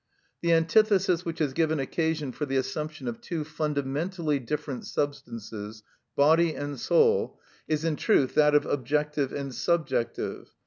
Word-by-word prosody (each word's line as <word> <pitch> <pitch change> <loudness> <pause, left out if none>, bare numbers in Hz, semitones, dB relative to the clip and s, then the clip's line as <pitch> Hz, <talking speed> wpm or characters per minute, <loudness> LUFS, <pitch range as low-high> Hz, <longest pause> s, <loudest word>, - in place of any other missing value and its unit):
The 170 - +2
antithesis 185 +1 +3
which 165 -1 -4
has 145 -4 0
given 160 0 +1
occasion 155 0 -1
for 150 +4 -4
the 135 - -2
assumption 155 - -3
of 235 -1 -4
two 170 -9 -3
fundamentally 150 +1 -2
different 135 +1 -4
substances, 115 -7 -4 0.3
body 160 +3 +4
and 145 -1 -5
soul, 460 -1 +2 0.3
is 155 0 0
in 160 -3 0
truth 130 - +2
that 150 -1 +4
of 150 - +4
objective 145 +1 0
and 140 -2 -4
subjective. 155 -8 -1
150 Hz, 140 wpm, -27 LUFS, 140-165 Hz, 0.3 s, body